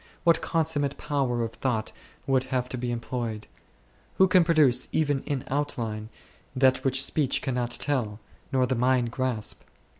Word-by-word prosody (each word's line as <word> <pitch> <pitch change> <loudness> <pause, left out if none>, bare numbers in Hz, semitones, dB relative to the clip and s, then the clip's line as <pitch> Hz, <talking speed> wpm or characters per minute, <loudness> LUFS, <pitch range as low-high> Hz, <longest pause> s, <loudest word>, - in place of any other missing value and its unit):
What 170 -1 +4
con 165 -1 0
summate 145 -3 -2
power 135 -5 -1
of 115 - -3
thought 115 -2 -2 0.3
would 130 -1 +1
have 130 -1 -1
to 125 - -4
be 125 0 -3
employed! 115 -2 -4 0.7
Who 190 - +5
could 180 -2 +4
produce 145 -7 +4
even 145 -3 +1
in 140 -3 -2
out 145 +2 -1
line 110 -2 -4 0.5
that 130 0 +3
which 135 0 +4
speech 140 -3 +1
cannot 125 -3 -1
tell, 120 -5 -1 0.3
nor 130 -2 +2
the 130 - -1
mind 125 -1 +1
grasp 125 -4 -2
130 Hz, 160 wpm, -26 LUFS, 120-145 Hz, 0.7 s, Who